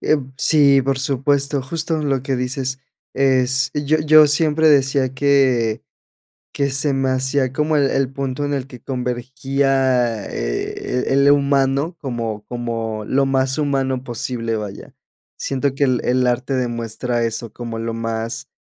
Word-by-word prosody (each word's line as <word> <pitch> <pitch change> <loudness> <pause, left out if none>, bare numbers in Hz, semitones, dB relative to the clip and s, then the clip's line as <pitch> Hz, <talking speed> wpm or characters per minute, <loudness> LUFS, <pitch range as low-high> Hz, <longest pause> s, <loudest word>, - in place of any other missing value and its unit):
Eh, 155 - +2 0.2
sí, 140 -3 +5
por 135 0 0
supuesto. 140 +1 0
Justo 160 +3 -2
lo 135 -3 0
que 135 0 -1
dices 130 +1 -3 0.3
es 130 -1 +2
yo 150 +1 +1
yo 155 0 +7
siempre 155 +1 +2
decía 135 -2 +3
que 130 -6 +2 0.7
que 140 -1 0
se 140 +1 +1
me 135 0 0
hacía 130 0 0
como 150 +2 0
el 140 -2 +3
el 135 -1 0
punto 135 +1 -3
en 145 - -2
el 135 -1 -3
que 125 -4 -12
convergía, 130 -2 0
eh, - - -3
el 140 +1 +3
el - - +7
humano 140 +3 +1
como 115 -6 -4
como 115 -3 -4
lo 135 +4 +1
más 130 -1 0
humano 135 -3 -1
posible, 115 -2 -3
vaya. 105 -2 -8 0.4
Siento 135 0 -1
que 140 +1 +1
el 125 -2 +1
el 125 0 +2
arte 125 +2 -1
demuestra 120 -1 -2
eso, 115 0 -3
como 115 -2 -6
lo 115 0 -3
más, 115 0 -4
130 Hz, 150 wpm, -20 LUFS, 120-140 Hz, 0.7 s, yo